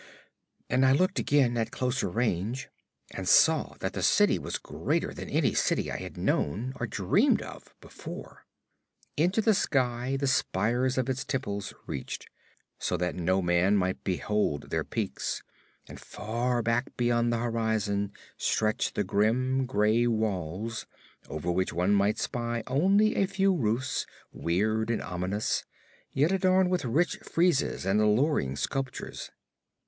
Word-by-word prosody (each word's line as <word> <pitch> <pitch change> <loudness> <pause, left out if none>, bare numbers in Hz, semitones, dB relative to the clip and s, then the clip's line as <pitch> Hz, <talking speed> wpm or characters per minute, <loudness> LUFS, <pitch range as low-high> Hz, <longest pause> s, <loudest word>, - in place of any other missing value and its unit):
And 130 +2 +2
I 130 0 +5
looked 185 +7 +2
again, 130 -5 +2
at 115 -1 0
closer 125 -5 -1
range, 115 +4 -1 0.4
and - - -5
saw - - +4
that - - -2
the - - -3
city - - +4
was - - -3
greater - - -2
than - - -7
any - - +2
city - - +1
I - - -3
had - - -8
known 110 - 0
or 120 - -2
dreamed 100 -3 +2
of - - -11
before. - - -10 0.7
Into 180 +8 +2
the 220 0 +4
sky 130 -8 0
the 140 - -1
spires 125 0 +1
of 130 -1 +1
its 130 0 -1
temples 100 -6 -3
reached, 70 - -5 0.5
so 90 - -1
that 90 +1 -1
no 95 +2 0
man 90 +4 +3
might 95 -1 -1
behold 95 -4 -1
their - - 0
peaks; - - -3 0.4
and - - -10
far 120 +3 -2
back 115 +3 -1
beyond 120 -1 +2
the 115 - +1
horizon 110 -4 -1 0.3
stretched 110 0 0
the 105 - +1
grim, 125 +7 +1
gray 110 +1 +2
walls, 110 -1 -2 0.4
over 80 +3 -2
which 95 +1 0
one 90 +4 +2
might 100 +1 +2
spy 120 -1 -2
only 195 +11 +3
a 195 - +2
few 195 0 +2
roofs, 125 -4 -1 0.3
weird 110 +6 0
and 115 - -1
ominous, 90 +4 -2 0.5
yet 145 +6 +2
adorned 185 -1 +3
with 180 -6 0
rich 170 - +1
friezes 170 - +1
and 100 +2 +2
alluring 105 - +2
sculptures. 135 - -4
115 Hz, 145 wpm, -28 LUFS, 100-130 Hz, 0.7 s, I